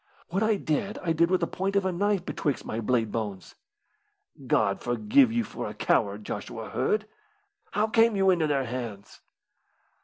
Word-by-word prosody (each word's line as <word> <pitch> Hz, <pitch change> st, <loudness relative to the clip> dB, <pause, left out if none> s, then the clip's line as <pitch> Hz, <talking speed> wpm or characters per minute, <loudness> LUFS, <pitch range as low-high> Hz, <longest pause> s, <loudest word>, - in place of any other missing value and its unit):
"What 190 Hz, +4 st, -1 dB
I 220 Hz, 0 st, +3 dB
did 195 Hz, +2 st, -2 dB
I 165 Hz, -2 st, +1 dB
did 170 Hz, +1 st, +3 dB
with 185 Hz, 0 st, +2 dB
the -, -, +2 dB
point 195 Hz, +2 st, -2 dB
of 200 Hz, -1 st, +2 dB
a 190 Hz, -, +1 dB
knife 195 Hz, 0 st, 0 dB
betwixt 145 Hz, -4 st, -2 dB
my 110 Hz, -, -3 dB
blade 115 Hz, -1 st, 0 dB
bones." 100 Hz, -5 st, -4 dB, 0.9 s
"God -, -, +2 dB
forgive 220 Hz, -, +3 dB
you 235 Hz, 0 st, +1 dB
for -, -, -6 dB
a -, -, -9 dB
coward, -, -, +1 dB
Joshua -, -, -6 dB
Hird. 430 Hz, 0 st, 0 dB, 0.7 s
How 210 Hz, +1 st, +2 dB
came 225 Hz, 0 st, +3 dB
you 195 Hz, -1 st, +4 dB
into 170 Hz, -4 st, +2 dB
their 140 Hz, -3 st, +1 dB
hands?" 115 Hz, -5 st, -6 dB
180 Hz, 175 wpm, -27 LUFS, 125-210 Hz, 0.9 s, you